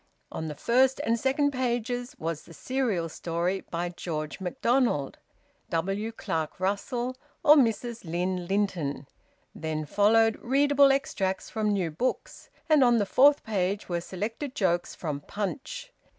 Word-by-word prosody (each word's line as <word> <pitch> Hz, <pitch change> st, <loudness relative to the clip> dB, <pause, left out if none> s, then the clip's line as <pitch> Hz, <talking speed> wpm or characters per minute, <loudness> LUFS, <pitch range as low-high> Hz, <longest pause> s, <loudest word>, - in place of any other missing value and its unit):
On 160 Hz, -, -4 dB
the 150 Hz, -, -5 dB
first 255 Hz, -, +3 dB
and 230 Hz, +1 st, +1 dB
second 285 Hz, +3 st, +2 dB
pages 245 Hz, -1 st, -2 dB
was 165 Hz, -1 st, -3 dB
the 165 Hz, -, -14 dB
serial 235 Hz, -, -1 dB
story, 170 Hz, +3 st, -2 dB
by 175 Hz, +1 st, -2 dB
George 155 Hz, -4 st, -5 dB
MacDonald, 190 Hz, -, 0 dB, 0.5 s
W. 195 Hz, +7 st, -1 dB
Clark 160 Hz, -8 st, -3 dB
Russell, 240 Hz, +6 st, -1 dB, 0.3 s
or 300 Hz, -, +8 dB
Mrs 235 Hz, -3 st, +1 dB
Lynn 180 Hz, +1 st, -2 dB
Linton; 180 Hz, -8 st, -1 dB, 0.5 s
then 155 Hz, -1 st, -3 dB
followed 220 Hz, +6 st, +3 dB
readable 280 Hz, +2 st, +4 dB
extracts 190 Hz, -8 st, -1 dB
from 215 Hz, -1 st, 0 dB
new 185 Hz, -5 st, 0 dB
books, 250 Hz, +12 st, -3 dB, 0.2 s
and 305 Hz, -4 st, +5 dB
on 240 Hz, -1 st, +5 dB
the 205 Hz, -, +2 dB
fourth 280 Hz, +8 st, +5 dB
page 200 Hz, -1 st, -1 dB
were 170 Hz, -1 st, -1 dB
selected 225 Hz, -, -5 dB
jokes 175 Hz, -3 st, 0 dB
from 150 Hz, -4 st, -4 dB
"Punch." 295 Hz, -, -5 dB
205 Hz, 135 wpm, -28 LUFS, 175-255 Hz, 0.5 s, or